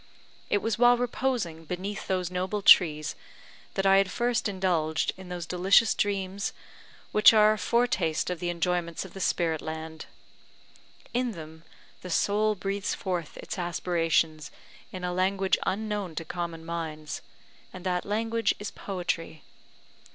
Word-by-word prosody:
It 205 - +1
was 225 0 -1
while 245 0 +6
reposing 240 -9 -2
beneath 185 +5 -5
those 185 -2 -1
noble 185 +3 -2
trees 155 -6 +6 0.6
that 195 - 0
I 195 0 +6
had 195 -1 +3
first 240 0 0
indulged 170 -5 0
in 190 -1 -11
those 175 -2 -4
delicious 190 +6 +4
dreams 195 -1 -1 0.6
which 210 +1 +7
are 215 0 +6
a - - -4
foretaste 185 -7 +1
of 180 - -4
the 175 - -2
enjoyments 175 0 -1
of 190 - -12
the 195 - -8
spirit 165 -4 0
land. 160 0 -6 1.1
In 245 -1 0
them 160 -1 -10 0.4
the 180 - -8
soul 210 +4 +2
breathes 195 +1 -2
forth 175 -5 -4
its - - -6
aspirations 165 -3 0 0.4
in 185 -1 -7
a 180 0 -1
language 190 +1 +1
unknown 205 -4 -2
to 165 - -4
common 170 -1 -5
minds; 155 -3 -5 0.5
and 185 -1 -10
that 180 -1 0
language 225 +2 0
is 205 0 -6
Poetry. 175 -5 -4
185 Hz, 145 wpm, -28 LUFS, 165-205 Hz, 1.1 s, which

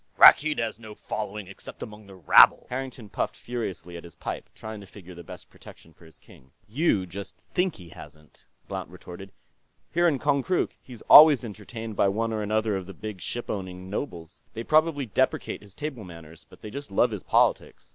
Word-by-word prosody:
"Rakkeed 150 +1 +7
has 115 0 -3
no 110 -2 -11
following, 105 -1 -5
except 95 +1 -9
among 105 -1 -11
the 95 - -13
rabble." 90 -6 +6
Harrington 125 -3 -5
puffed 95 - -3
furiously 110 -7 -6
at 85 - -10
his 85 - -13
pipe, - - -6
trying 110 -1 -8
to 100 - -13
figure 95 -2 -13
the 85 0 -11
best - - -11
protection 80 - -16
for 85 - -19
his 80 -2 -18
king. 65 - -19 0.2
"You 110 - +1
just 95 +3 -8 0.2
think 180 -1 +1
he 90 -2 -13
hasn't," 75 -1 -15 0.2
Blount - - -5
retorted. 95 +2 -11 0.6
"Here 175 +1 +3
in 150 -5 +2
Konkrook, 145 +6 0
he's 125 -3 -12
always 145 -5 +9
entertained 110 +1 -8
by 100 - +3
one 110 +3 -1
or 110 - -2
another 110 0 0
of 95 -1 -5
the 95 - -10
big 105 -3 -7
ship 120 - -5
owning 95 -1 -6
nobles. 85 - -6
They 115 - -4
probably 155 0 +2
deprecate 110 - -1
his 100 -2 -17
table 145 -7 -5
manners, 85 -3 -13
but - - -17
they 105 - -7
just 140 +3 -7
love 95 - +2
his - - -5
politics. - - +1
105 Hz, 195 wpm, -26 LUFS, 95-125 Hz, 0.6 s, always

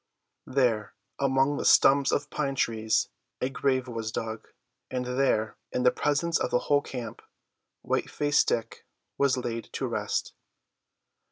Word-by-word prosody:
There, 120 -6 +1 0.2
among 135 +1 +2
the - - -2
stumps 140 0 +5
of 145 0 -1
pine 140 -2 -1
trees, 110 -3 +1 0.3
a 130 - -1
grave 130 -1 0
was 115 -2 -4
dug, 110 0 -5 0.4
and 125 -1 -2
there, 125 -4 0
in 125 - -1
the 125 - +6
presence 160 +3 0
of - - -1
the - - +2
whole 145 +3 +2
camp, 120 -6 -7 0.6
White - - -1
faced 145 0 +2
Dick 115 -1 -2 0.4
was 140 -2 +3
laid 115 -2 -4
to - - -2
rest. - - -2
130 Hz, 145 wpm, -28 LUFS, 115-140 Hz, 0.6 s, the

